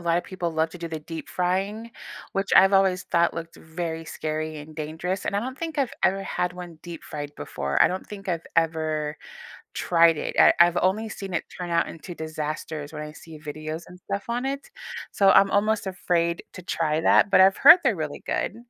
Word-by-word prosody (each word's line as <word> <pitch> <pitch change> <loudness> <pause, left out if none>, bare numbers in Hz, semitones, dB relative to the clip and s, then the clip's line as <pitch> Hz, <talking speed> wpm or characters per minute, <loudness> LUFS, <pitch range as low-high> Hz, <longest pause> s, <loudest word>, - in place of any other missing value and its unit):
lot 170 0 +1
of - - -5
people 185 -3 -3
love 160 0 0
to 180 - -10
do 170 0 -5
the 160 -1 -4
deep 160 +1 -8
frying, 195 +5 -1 0.4
which 195 +1 -1
I've 195 +1 +7
always 190 -1 +3
thought 170 0 +2
looked 165 0 -7
very 160 0 -5
scary 155 0 -4
and 155 +1 -11
dangerous, 160 +5 -4
and 200 - -1
I - - +1
don't 255 +3 -5
think 325 -1 -5
I've 270 -3 0
ever 195 +1 +2
had 180 -1 -2
one 175 -3 -9
deep-fried 150 -4 -7
before, 70 0 -3
I - - +8
don't 185 +1 -4
think 200 -2 -9
I've 170 -2 -2
ever 155 -2 0 0.6
tried 170 -2 +4
it. - - -4
I - - +8
I've 175 0 +6
only 200 +5 +1
seen 195 -3 -7
it - - -1
turn 180 -1 -5
out 170 0 +2
into 170 +2 -9
disasters 155 -1 -5
when 150 -1 -6
I 150 - -7
see 160 0 -12
videos 155 +2 -6
and 180 0 -13
stuff 200 0 -4
on 240 +2 -1
it. 275 +1 -4 0.4
So 195 -1 +4
I'm 195 0 +6
almost 215 +1 +1
afraid 175 -2 0
to 185 - -10
try 160 -3 0
that, 200 - +5
but 200 - +6
I've 190 +1 +5
heard 330 +5 +10
they're 240 -6 +2
really 155 -3 -5
good. - - -2
170 Hz, 210 wpm, -25 LUFS, 160-195 Hz, 0.6 s, heard